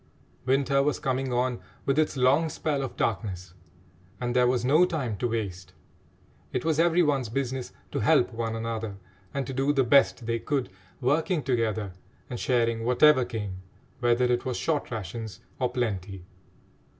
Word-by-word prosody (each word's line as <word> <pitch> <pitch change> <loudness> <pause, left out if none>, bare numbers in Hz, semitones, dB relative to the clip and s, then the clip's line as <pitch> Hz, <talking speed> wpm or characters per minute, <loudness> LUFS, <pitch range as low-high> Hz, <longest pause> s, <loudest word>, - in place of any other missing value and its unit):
Winter 140 +1 +3
was 145 +1 +1
coming 135 -2 -1
on 125 -1 0 0.3
with 135 +2 +2
its 155 -2 +1
long 135 +6 +3
spell 150 -2 -2
of 135 - -5
darkness, 95 -5 -2 0.7
and 120 0 -2
there 125 -1 +5
was 125 -1 +1
no 155 +7 +5
time 150 -11 -1
to 120 - 0
waste. 100 -5 -4 0.8
It 125 - -2
was 160 -1 +1
every 170 +1 +4
one's 135 -6 +1
business 130 +1 -3 0.2
to - - -2
help - - +3
one 115 0 -2
another 110 -2 -3 0.4
and 140 -1 -2
to 135 - -5
do 135 +2 +1
the 135 -2 +3
best 130 -1 +4
they 115 0 -1
could, 135 -3 -2 0.3
working 155 +5 +1
together 110 -6 -1 0.4
and 120 - -4
sharing 115 -3 +1
whatever 130 +3 +5
came, 105 -6 -5 0.4
whether 120 0 +3
it 120 0 +1
was 125 -2 -2
short 155 -3 -1
rations 110 -1 -6 0.2
or 125 -2 +1
plenty. 100 -7 -3
125 Hz, 160 wpm, -27 LUFS, 115-140 Hz, 0.8 s, there